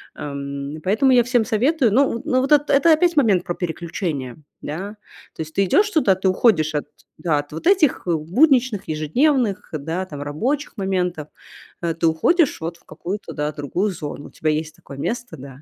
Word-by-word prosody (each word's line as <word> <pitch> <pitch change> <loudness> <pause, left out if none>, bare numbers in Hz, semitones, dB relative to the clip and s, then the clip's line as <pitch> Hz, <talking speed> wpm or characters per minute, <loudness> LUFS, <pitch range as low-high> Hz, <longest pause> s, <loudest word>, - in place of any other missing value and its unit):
ам, 140 0 -6
поэтому 220 +8 +3
я 245 -2 +5
всем 245 -2 +1
советую. 250 +2 +2
Ну, 270 +5 +3
н - - -8
ну, 255 - +2
вот 270 - -2
эт 295 0 +4
это 315 +4 +5
опять 345 +2 +2
момент 205 -10 +4
про 175 - -3
переключения, 160 -6 -4 0.2
да. 190 +8 -6 0.4
То - - -6
есть 155 0 -7
ты 195 - +2
идёшь 400 - +3
туда, 285 - +3
ты 190 +1 -1
уходишь 185 -6 +2
от, 150 - -1 0.3
да, 155 -4 0
от 145 0 -7
вот 160 - -4
этих 365 -8 +3
будничных 225 - +2
ежедневных, 210 - 0
да, 165 +5 -3
там, 145 -5 -8
рабочих 240 - -2
моментов, 180 -5 -2 0.5
э. 170 -1 -1
Ты 165 0 -2
уходишь 275 - +2
вот 165 +1 -4
в - - -29
какую-то, 200 +4 -6
да, 150 0 -2
другую 155 +8 -2
зону. 150 -4 -7
У - - -14
тебя 155 - -2
есть 155 0 -3
такое 140 - -12
место, 240 - -4
да, 135 +1 -11
185 Hz, 190 wpm, -21 LUFS, 155-250 Hz, 0.5 s, я